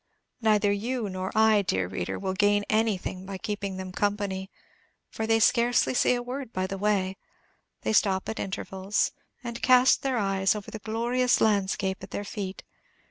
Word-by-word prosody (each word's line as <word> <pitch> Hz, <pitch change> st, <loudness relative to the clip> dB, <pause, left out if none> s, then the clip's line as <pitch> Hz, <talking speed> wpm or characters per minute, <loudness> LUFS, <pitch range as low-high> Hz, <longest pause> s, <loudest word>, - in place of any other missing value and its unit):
Neither 210 Hz, -2 st, +3 dB
you 225 Hz, +2 st, -2 dB
nor 185 Hz, 0 st, -4 dB
I, 220 Hz, -1 st, +5 dB
dear 95 Hz, -, 0 dB
reader, 90 Hz, -1 st, -4 dB
will 190 Hz, -1 st, -2 dB
gain 205 Hz, +1 st, +3 dB
anything 215 Hz, -4 st, 0 dB
by 195 Hz, 0 st, -6 dB
keeping 200 Hz, -1 st, -4 dB
them 185 Hz, 0 st, -6 dB
company, 200 Hz, -1 st, -2 dB, 0.6 s
for 220 Hz, -, -3 dB
they 225 Hz, 0 st, +3 dB
say 235 Hz, +2 st, +4 dB
scarcely 250 Hz, +1 st, +3 dB
a 245 Hz, -, -3 dB
word 255 Hz, 0 st, -6 dB
by 185 Hz, -3 st, -1 dB
the 195 Hz, +1 st, -5 dB
way. 195 Hz, -2 st, 0 dB, 0.6 s
They -, -, -1 dB
stop 195 Hz, -3 st, +2 dB
at 220 Hz, -, -4 dB
intervals, 190 Hz, +1 st, -1 dB, 0.3 s
and 235 Hz, -1 st, -6 dB
cast 255 Hz, 0 st, +5 dB
their 265 Hz, -2 st, 0 dB
eyes 195 Hz, -1 st, +1 dB
over 210 Hz, -2 st, -7 dB
the 220 Hz, -, -6 dB
glorious 240 Hz, +4 st, +1 dB
landscape 195 Hz, -2 st, +1 dB
at 190 Hz, -, -9 dB
their 205 Hz, -, -4 dB
feet. 200 Hz, -2 st, -6 dB
205 Hz, 170 wpm, -27 LUFS, 190-225 Hz, 0.6 s, I